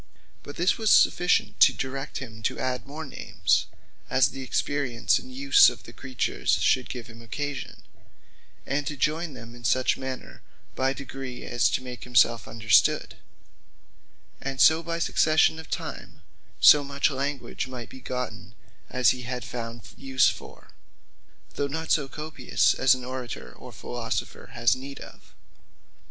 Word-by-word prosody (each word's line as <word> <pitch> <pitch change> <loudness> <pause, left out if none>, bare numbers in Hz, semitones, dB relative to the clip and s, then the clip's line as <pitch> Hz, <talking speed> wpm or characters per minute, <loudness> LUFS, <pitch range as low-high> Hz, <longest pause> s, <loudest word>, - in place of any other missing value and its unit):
But 145 - -10
this 175 +6 +1
was 220 -1 +1
sufficient 180 0 +3
to - - +7
direct 135 0 -5
him 115 -4 -8
to - - -9
adde 125 0 -3
more 155 +3 -7
names, 90 - 0 0.4
as 130 - +4
the 135 - -8
experience 130 -2 0
and 130 - -12
use 135 +1 +6
of - - -10
the 115 - -12
creatures 130 +1 -2
should 130 -1 +2
give 125 -3 -6
him 115 -1 -13
occasion; 140 +4 -5 0.8
and 140 +1 -2
to 150 - -4
joyn 155 +2 -1
them 115 -1 -11
in 120 0 -14
such 130 +3 +2
manner 130 -1 -7 0.3
by 130 0 +1
degrees, 135 -2 -7
as 120 -2 +3
to - - -1
make 125 -1 -8
himselfe 120 -3 +3
understood; 110 -1 +2 1.2
and 135 -1 -4
so 160 +3 +6
by 170 0 -3
succession 160 -1 +3
of 160 - -11
time, - - -6 0.4
so 150 -1 +8
much 140 +1 0
language 140 -1 -3
might 125 -2 -8
be 130 - -12
gotten, 110 -5 -5 0.3
as 125 -2 +3
he 125 - -4
had 125 0 -5
found 115 -2 -6
use 130 -1 +3
for; - - -10 0.8
though 145 - -1
not 160 +3 -4
so 145 -3 +2
copious, 150 -2 0
as 130 0 +4
an 125 -1 -8
Orator 130 -2 -6
or - - -12
Philosopher - - -5
has 120 -1 +3
need 135 +2 -9
of. - - -14
130 Hz, 155 wpm, -26 LUFS, 120-140 Hz, 1.2 s, so